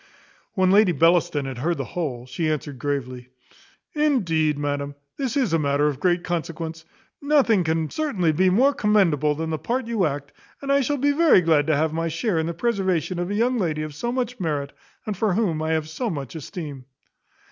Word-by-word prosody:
When 185 -2 +3
Lady 200 -2 +5
Bellaston 165 -2 +2
had 130 -2 -6
heard 170 +5 0
the 135 - -2
whole, 130 -6 -4
she 155 +5 -2
answered 145 -3 -3
gravely, 130 -3 -4 0.6
"Indeed, 170 - +1
madam, 145 0 -3 0.2
this 270 0 -2
is 245 - +1
a 165 - +3
matter 145 0 +1
of 145 -3 0
great 175 +1 +1
consequence. 165 -1 -4 0.4
Nothing 280 -9 +3
can 160 -1 0
certainly 215 - 0
be 185 +5 +3
more 255 +10 +4
commendable 170 - +2
than 160 +1 -3
the 155 - -2
part 250 +1 -2
you 225 -7 +1
act; 140 -1 -6 0.3
and 275 0 -3
I 280 0 +4
shall 290 +3 0
be 285 +2 +2
very 310 - +5
glad 160 -3 +2
to 155 - +3
have 155 +2 0
my 165 +1 -1
share 165 +3 -1
in 160 - -1
the 170 - -2
preservation 185 -5 0
of 175 +1 -2
a 205 - -2
young 240 +3 +1
lady 155 -5 -1
of 155 -1 -6
so 235 +11 -3
much 250 -1 -3
merit, 145 -5 -2 0.3
and 210 - -3
for 200 -1 0
whom 185 -8 0
I 160 0 0
have 160 -1 -1
so 190 +10 -3
much 140 - -5
esteem." 150 -4 -7
165 Hz, 200 wpm, -23 LUFS, 150-215 Hz, 0.6 s, Lady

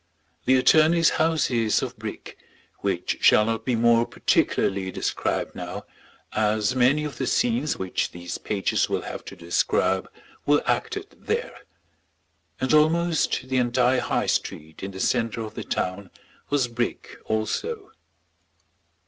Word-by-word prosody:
The 130 - +5
attorney's 160 +6 +5
house 160 -3 +2
is 115 -3 +2
of - - -4
brick, - - -8 0.4
which - - -2
shall 105 - +6
not 115 0 -2
be 125 - +1
more 115 0 +4
particularly 95 -1 +1
described - - -2
now - - -6 0.5
as 110 +1 +1
many 130 +4 +3
of 150 -2 -6
the - - -1
scenes 235 -11 +1
which 95 -1 -2
these 90 0 -7
pages 100 -2 0
will - - -1
have - - -6
to - - -9
describe 85 +2 0 0.3
were 145 0 +3
acted 415 -2 -2
there; 470 +2 -1 1.0
and 130 +3 0
almost 160 -3 +2
the 130 0 0
entire 125 +1 +2
High - - 0
Street 80 +1 -3
in 95 - -4
the 95 -1 -9
centre 115 +1 0
of 110 -1 -6
the - - -6
town 95 +1 -3 0.4
was 145 -4 +2
brick 120 0 -4
also. 110 -1 -2
120 Hz, 140 wpm, -25 LUFS, 105-150 Hz, 1.0 s, shall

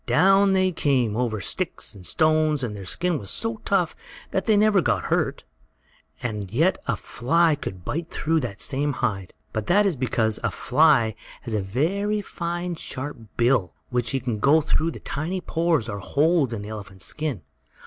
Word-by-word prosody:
Down 195 +3 +5
they 185 -1 +3
came, 130 -9 +1
over 115 -3 -1
sticks 95 - -3
and 95 - -12
stones, 155 - +2
and 110 -4 -3
their 100 -2 -8
skin 175 - 0
was 100 - -6
so 225 0 -1
tough 185 -5 +1 0.4
that 190 - -1
they 215 -2 +4
never 205 -2 +4
got 110 - +1
hurt. - - 0 0.8
And 105 -5 -3
yet 160 - +2
a 130 - +1
fly 160 - +2
could 95 - -6
bite 165 +2 -3
through 160 +1 0
that 115 -8 -5
same 145 +1 0
hide! 100 -8 -2 0.2
But 110 -1 -3
that 205 +3 +4
is 190 -5 +2
because 115 -4 0
a 115 - +2
fly 125 -1 +3 0.3
has 115 - -5
a 105 - +1
very 195 - 0
fine, 175 0 -3
sharp 145 -3 -5 0.2
bill, 120 -6 +2 0.2
which 120 -2 0
can 120 -4 -2
go 145 +7 +5
through 155 +1 0
the - - -7
tiny 165 +6 -3
pores, 165 -7 0
or 100 -2 -4
holes, 145 - +2
in 110 -3 -4
the 105 - -7
elephant's 100 -3 -7
skin. 145 - -3
140 Hz, 180 wpm, -24 LUFS, 110-170 Hz, 0.8 s, Down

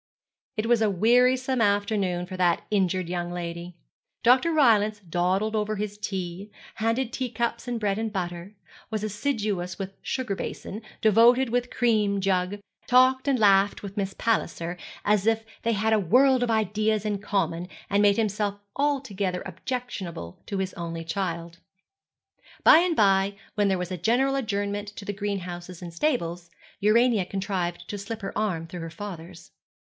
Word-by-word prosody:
It 215 - 0
was 235 -1 +3
a 215 - +3
wearisome 250 +5 +3
afternoon 200 -4 +1
for 185 +1 -7
that 175 -2 +2
injured 185 -3 +1
young 175 0 -3
lady. 170 0 -5 0.5
Dr. 255 +7 +5
Rylance 215 -8 +4
dawdled 185 +5 0
over 215 0 0
his 205 0 -3
tea, 195 -2 -5 0.3
handed 230 +3 0
teacups 235 -1 -2
and 240 -1 -2
bread 205 -1 0
and 225 -1 -2
butter, 175 0 -5 0.3
was 215 -2 -3
assiduous 210 -5 -2
with 195 -1 -5
the - - -36
sugar 245 -7 -2
basin, 205 +2 -6 0.2
devoted 230 +4 +5
with 245 0 +1
the - - -20
cream 215 -5 +2
jug, 190 0 0 0.3
talked 260 +2 +4
and 275 -2 +3
laughed 200 -2 +4
with 200 -1 -7
Miss 195 -2 -2
Palliser, 175 -6 -1 0.3
as 210 0 +2
if 225 0 +2 0.2
they 230 0 +1
had 220 +2 +1
a 220 - +4
world 255 +7 +4
of 245 - 0
ideas 215 -1 +1
in 205 -2 -1
common, 195 -4 -1 0.2
and 200 +1 +2
made 205 -1 +4
himself 210 -2 -1 0.2
altogether 220 -11 -1
objectionable 185 - -5
to 200 - -3
his 190 -1 -2
only 165 -1 -5
child. 170 -1 -4 1.0
By 315 - +9
and 350 -1 +1
by, 195 -2 +3 0.2
when 205 -1 +2
there 190 -1 +2
was 180 0 -4
a 185 - -2
general 245 +10 +2
adjournment 205 -4 -2
to 200 - -8
the 205 - -3
greenhouses 185 -3 -5
and 175 -2 -8
stables, 175 - -1 0.3
Urania 220 0 +4
contrived 185 -3 -3
to 205 - -5
slip 220 +2 -6
her 195 - -5
arm 185 -7 -1
through 175 +2 -8
her 165 - -5
father's. 175 -1 -9
205 Hz, 165 wpm, -26 LUFS, 185-225 Hz, 1.0 s, By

